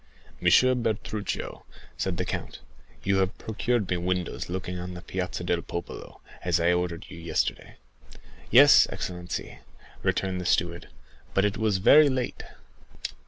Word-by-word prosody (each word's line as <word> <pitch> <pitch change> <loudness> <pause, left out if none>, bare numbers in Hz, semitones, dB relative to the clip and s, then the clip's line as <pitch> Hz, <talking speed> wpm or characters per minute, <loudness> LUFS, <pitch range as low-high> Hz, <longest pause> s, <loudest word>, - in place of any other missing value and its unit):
"Monsieur 130 0 +5
Bertuccio," 110 -3 -3 0.3
said 95 -2 -2
the 90 - -1
count, - - -5 0.5
"you 100 0 +2
have 95 0 0
procured 115 -1 -1
me 90 - 0
windows 90 0 -2
looking 90 0 -4
on 90 +1 -6
the 90 - -9
Piazza 90 -1 -4
del 85 0 0
Popolo, 85 - -7 0.2
as 85 -1 +1
I 85 +1 +3
ordered 90 -1 -2
you 90 -2 -9
yesterday." 85 -1 -2 0.7
"Yes, - - +8
excellency," 90 -1 -5 0.4
returned 95 -1 -1
the - - -7
steward; 85 -2 0 0.5
"but 95 - +4
it 105 +1 0
was 110 -3 +2
very 145 +10 +7
late." 130 -2 -2
90 Hz, 140 wpm, -27 LUFS, 90-105 Hz, 0.7 s, Yes